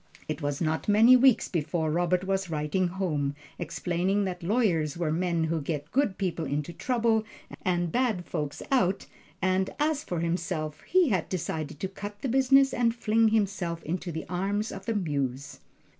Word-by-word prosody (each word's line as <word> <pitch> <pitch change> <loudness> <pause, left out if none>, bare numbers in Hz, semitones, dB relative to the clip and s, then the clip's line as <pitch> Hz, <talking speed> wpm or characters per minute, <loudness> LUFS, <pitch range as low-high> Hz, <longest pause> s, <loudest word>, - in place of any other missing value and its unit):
It 155 +1 -4
was 145 -1 -2
not 160 -1 -1
many 220 +5 +7
weeks 255 -1 +5
before 160 -1 -1
Robert 175 +2 +1
was 195 -1 -1
writing 155 +4 0
home, 155 -6 -1 0.2
explaining 180 +4 0
that 180 -2 -4
lawyers 170 - +1
were 170 -3 0
men 170 0 0
who 160 0 -1
get 150 0 -4
good 255 -8 +1
people 175 -4 -2
into 150 +3 -3
trouble, 230 -2 +1 0.4
and 175 -2 0
bad 235 -8 0
folks 150 -2 -4
out; 195 -8 +2 0.4
and 185 0 +2
as 300 0 +1
for 175 - -3
himself 165 -2 -2
he 365 -4 +4
had 185 -7 0
decided 155 -5 -3
to 190 - 0
cut 205 +2 -8
the 265 - 0
business 270 +2 +4
and 235 -1 +1
fling 225 -1 +3
himself 195 -6 0
into 175 +2 -3
the 160 0 -5
arms 200 +5 -1
of 195 - -9
the 230 - 0
Muse. 140 -7 -2
180 Hz, 170 wpm, -28 LUFS, 160-215 Hz, 0.4 s, many